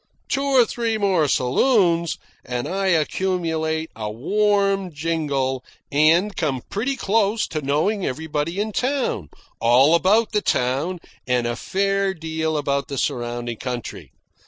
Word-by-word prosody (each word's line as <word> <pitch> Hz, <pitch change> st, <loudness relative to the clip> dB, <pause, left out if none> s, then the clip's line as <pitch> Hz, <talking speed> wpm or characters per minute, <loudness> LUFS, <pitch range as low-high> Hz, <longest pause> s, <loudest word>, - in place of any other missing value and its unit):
Two 275 Hz, -, 0 dB
or 270 Hz, -3 st, +4 dB
three 225 Hz, 0 st, -1 dB
more 190 Hz, -7 st, +2 dB
saloons, 170 Hz, -, +2 dB, 0.3 s
and 125 Hz, -1 st, -3 dB
I 195 Hz, +1 st, -1 dB
accumulate 160 Hz, -2 st, 0 dB
a 110 Hz, -1 st, -4 dB
warm 195 Hz, -, +1 dB
jingle 145 Hz, -5 st, -1 dB, 0.3 s
and 165 Hz, +8 st, +3 dB
come 135 Hz, -6 st, -1 dB
pretty 250 Hz, +7 st, -1 dB
close 215 Hz, -1 st, +1 dB
to 155 Hz, -, -3 dB
knowing 155 Hz, +9 st, 0 dB
everybody 160 Hz, +5 st, -2 dB
in 215 Hz, +1 st, -1 dB
town, 250 Hz, -, -1 dB, 0.3 s
all 125 Hz, +6 st, +5 dB
about 205 Hz, +6 st, +3 dB
the 210 Hz, -2 st, +1 dB
town, 140 Hz, +8 st, 0 dB, 0.3 s
and 125 Hz, -1 st, +1 dB
a 120 Hz, 0 st, -1 dB
fair 195 Hz, -, 0 dB
deal 160 Hz, -1 st, -2 dB
about 140 Hz, -1 st, -1 dB
the 140 Hz, -, -5 dB
surrounding 120 Hz, -1 st, -2 dB
country. 125 Hz, -2 st, -6 dB
165 Hz, 135 wpm, -22 LUFS, 135-200 Hz, 0.3 s, all